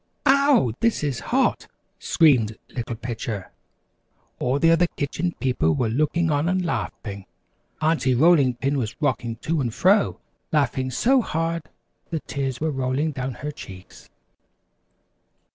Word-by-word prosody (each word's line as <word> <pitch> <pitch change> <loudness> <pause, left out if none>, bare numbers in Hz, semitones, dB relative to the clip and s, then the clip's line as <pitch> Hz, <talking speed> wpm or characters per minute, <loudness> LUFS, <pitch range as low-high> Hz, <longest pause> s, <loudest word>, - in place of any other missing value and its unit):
"Ouw! 275 - +4
this 230 -8 +1
is 140 -5 -1
hot!" 265 +3 +1 0.3
screamed 125 -10 +3 0.2
Little 120 -2 -4
Pitcher. 115 -4 -5 0.9
All 125 +2 +1
the 165 +3 +4
other 170 +1 +4
Kitchen 160 +4 -3
People 100 - +1
were 120 - 0
looking 155 +6 +1
on 145 +3 +1
and 185 0 0
laughing. 100 - -4 0.5
Aunty 155 -5 +2
Rolling 140 -3 +4
Pin 135 +3 -1
was 115 -2 -4
rocking 120 -6 -1
to 155 +6 -2
and 120 -3 -1
fro, 195 - +2 0.3
laughing 130 -4 +1
so 255 - +3
hard 165 -4 -2 0.4
the 165 - -2
tears 135 -2 -3
were 155 0 0
rolling 135 +3 -1
down 130 -2 -4
her 150 - -2
cheeks. 95 -9 -12
140 Hz, 135 wpm, -23 LUFS, 125-165 Hz, 0.9 s, Ouw